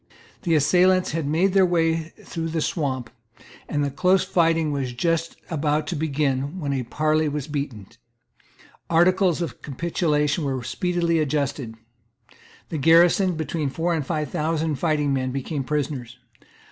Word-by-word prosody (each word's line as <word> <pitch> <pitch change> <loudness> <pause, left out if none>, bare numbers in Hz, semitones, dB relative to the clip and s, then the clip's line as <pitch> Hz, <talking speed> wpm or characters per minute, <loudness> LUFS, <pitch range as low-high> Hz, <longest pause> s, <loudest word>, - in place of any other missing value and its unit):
The 165 -3 +1
assailants 180 +5 +3
had 160 -2 -2
made 175 +6 +2
their 195 -1 +5
way 165 -2 +1 0.2
through 165 -1 -4
the 165 0 -2
swamp, 130 -9 -2 0.6
and 145 -1 0
the 140 - -1
close 185 +6 +3
fighting 165 -3 +2
was 135 -3 -2
just 165 +5 -1 0.2
about 150 -1 0
to 175 - -3
begin, 145 0 -1
when 145 -4 -2
a 135 - -1
parley 155 +5 0
was 145 0 -4
beaten. 140 -9 -4 1.0
Articles 175 +1 +3
of 145 -9 -7
capitulation 150 0 0
were 135 -3 -2
speedily 170 +5 0
adjusted. 140 -5 -2 0.9
The 160 - -3
garrison, 170 +4 +5
between 155 -2 -2
four 165 +6 -1
and 160 -3 -1
five 150 -1 -3
thousand 155 -1 -1
fighting 150 -3 +1
men, 130 -1 -1
became 135 +2 -3
prisoners. 130 -4 -3
155 Hz, 145 wpm, -24 LUFS, 140-165 Hz, 1.0 s, their